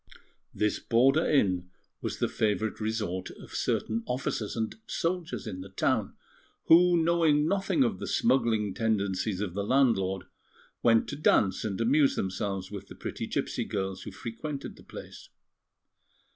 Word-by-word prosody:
This 105 0 0
border 135 +7 +3
inn 95 -10 +2 0.3
was - - -3
the - - +1
favourite 110 0 -1
resort 105 -4 -2
of - - -12
certain 110 +1 -1
officers 125 -4 -2
and 110 -1 -2
soldiers 165 - -2
in 95 - -5
the 95 - -9
town, 95 - 0 0.5
who, 175 +1 +6
knowing 160 -3 +3
nothing 195 - +2
of 235 -4 -1
the - - -5
smuggling 115 - +2
tendencies 100 -3 0
of 100 -5 -3
the 100 +1 -2
landlord, 100 -6 +2 0.6
went 115 -1 +4
to 145 - -4
dance 105 -9 +2
and 105 -2 -3
amuse 135 +5 +3
themselves 95 0 -3
with 100 -1 -7
the - - -11
pretty - - -5
gipsy - - -2
girls 95 -1 -3
who - - -7
frequented 135 +5 -6
the - - -16
place. - - -11
110 Hz, 145 wpm, -29 LUFS, 100-145 Hz, 0.6 s, who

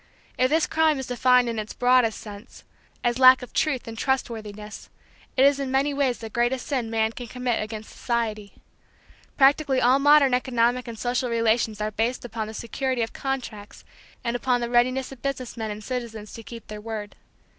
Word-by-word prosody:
If 255 0 +2
this 315 +2 +3
crime 315 -2 +2
is 265 - -4
defined 250 0 +3
in 230 -2 -2
its 215 0 -6
broadest 250 -3 +3
sense, 205 0 -11 0.4
as 240 +1 0
lack 255 0 +8
of 250 - -11
truth 280 -7 0
and 225 - -6
trustworthiness, 215 -5 -4 0.5
it 265 - +6
is 280 0 +4
in 275 -1 -2
many 275 +2 +1
ways 275 -3 +1
the 225 - -8
greatest 240 +2 0
sin 255 -6 -2
man 220 0 +1
can 245 +1 -8
commit 250 0 -2
against 215 0 -7
society. 215 -4 -3 0.8
Practically 275 -1 +4
all 255 +2 +4
modern 285 -2 +5
economic 250 0 +1
and 230 -1 -7
social 245 +2 -1
relations 230 -2 +1
are 215 0 -1
based 230 +4 -1
upon 225 -2 -4
the 220 - -8
security 255 +2 -2
of 225 - -5
contracts 245 -7 -5 0.4
and 235 0 -1
upon 245 0 +1
the 235 0 -3
readiness 255 +2 +2
of 265 -3 -11
business 265 -3 -4
men 220 -2 -4
and 210 0 -6
citizens 225 -3 -5
to 230 - -8
keep 230 0 -10
their 210 0 -8
word. 215 -2 -6
240 Hz, 190 wpm, -25 LUFS, 225-260 Hz, 0.8 s, lack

